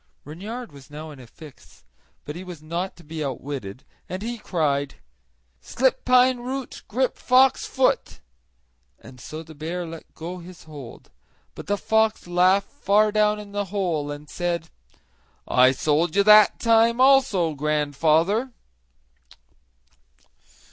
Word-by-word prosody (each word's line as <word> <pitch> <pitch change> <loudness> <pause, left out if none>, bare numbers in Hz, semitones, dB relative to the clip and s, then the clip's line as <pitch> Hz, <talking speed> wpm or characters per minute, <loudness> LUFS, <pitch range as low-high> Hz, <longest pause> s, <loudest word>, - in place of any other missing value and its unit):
Reynard 205 - -7
was 140 0 -15
now 155 +1 -8
in 145 - -12
a 125 - -13
fix; 150 +3 -16 0.4
but 150 - -6
he 180 - -7
was 175 -4 -10
not 170 +4 -4
to 170 - -16
be 155 0 -5
outwitted, 130 -5 -6 0.3
and 185 +3 -5
he 235 0 -4
cried: 145 -8 -1 0.6
"Slip 255 - 0
pine 255 0 +4
root, 260 +1 -6
grip 255 +4 -1
fox 260 +1 +3
foot," 260 -1 0 0.8
and 125 -1 -14
so 155 +4 -8
the 160 0 -13
bear 165 +4 -5
let 165 -1 -11
go 175 +3 -7
his 180 0 -12
hold; 145 -6 -12 0.4
but - - -10
the 205 +1 0
fox 220 +1 +1
laughed 180 +3 +2
far 210 +2 +2
down 210 0 +2
in 205 -1 -10
the 205 0 -2
hole 175 -7 -2
and 145 +1 -7
said: 170 0 -3 0.8
"I 130 +1 +5
sold 155 +5 0
you 200 - +4
that 210 +1 +6
time, 230 +1 +3
also, 255 - +4
grandfather!" 155 - +1
175 Hz, 140 wpm, -24 LUFS, 150-215 Hz, 0.8 s, that